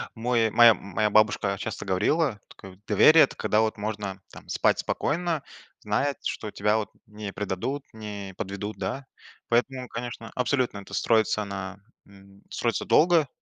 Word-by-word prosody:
мой 115 -1 +1
моя 120 -1 +8
моя 105 +2 -1
бабушка 105 -2 +2
часто 110 0 -5
говорила, 105 - +1
тк 95 -1 -13
доверие- 160 0 +7
это - - -1
когда 105 - +1
вот 110 -1 -1
можно 105 -2 -4
там - - -13
спать - - +2
спокойно, 165 -1 -1 0.4
зная, 135 +7 0
что 105 -2 -4
тебя 105 +2 +1
вот 110 - -3 0.2
не 105 -2 -7
предадут, 105 +8 -3
не 105 -3 -7
подведут, 105 +1 -5
да? 135 0 -4 0.4
Поэтому, 125 +2 0
конечно, 115 -1 -7
абсолютно 125 -4 0
это 100 - -13
строится 110 -2 +2
на, 95 -1 -6 0.3
м, 100 0 -18
строится - - -1
долго, 165 -3 +4
110 Hz, 150 wpm, -26 LUFS, 100-125 Hz, 0.4 s, моя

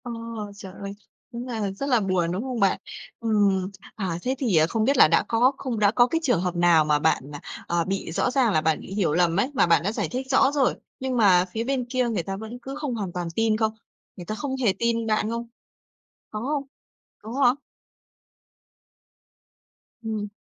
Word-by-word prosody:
Ờ, 245 - -6 0.4
trời 190 -2 -10
ơi! 200 0 -7 0.4
Đúng 240 +2 -5
là 220 -5 -2
rất 275 +9 -4
là 245 -3 +4
buồn, 185 -4 0
đúng 185 +4 -2
không 255 -3 -4
bạn? 195 -2 +3 0.4
Ừm, 205 -4 +1 0.2
à, 185 -5 -2
thế 260 +6 -1
thì, 240 -9 0
à, 155 0 +5
không 220 +5 0
biết 275 +4 +2
là - - +8
đã - - +3
có 240 +3 +4
không 245 -5 -3
đã 205 -1 +4
có 240 +2 +4
cái 330 - 0
trường 245 - +2
hợp 180 -1 -2
nào 170 -2 +4
mà 150 -1 +2
bạn, 140 -1 0
à, 145 - -7 0.3
à, 170 0 +1
bị 195 -3 -3
rõ 245 - 0
ràng 255 -5 +2
là 155 - +3
bạn 160 0 +1
bị - - -9
hiểu 185 -7 +1
lầm 170 0 +2
ấy, 255 +7 0
mà 245 - +3
bạn 165 -2 +4
đã 200 - 0
giải - - -2
thích 255 +1 -3
rõ 270 +1 +4
rồi, 280 -3 +2 0.2
nhưng 260 -1 -2
mà 185 -5 +5
phía 225 +3 -2
bên 260 0 -1
kia 250 -1 +1
người 205 -7 -1
ta 195 +3 -4
vẫn 220 +4 -8
cứ 270 +3 -7
không 295 -5 -3
hoàn 200 -5 -3
toàn 175 -1 -3
tin 225 -1 +2
không? 220 -1 +1 0.4
Người 175 - -9
ta 215 - -4
không 265 +3 -3
hề 205 -5 +4
tin 230 -1 0
bạn 215 0 +1
không? 235 +1 -4 0.8
Có 215 - -5
không? 285 0 -1 0.6
Có 220 - -8
hả? 245 0 +5 2.5
Ừm. 215 -2 -3
220 Hz, 215 wpm, -25 LUFS, 185-245 Hz, 2.5 s, là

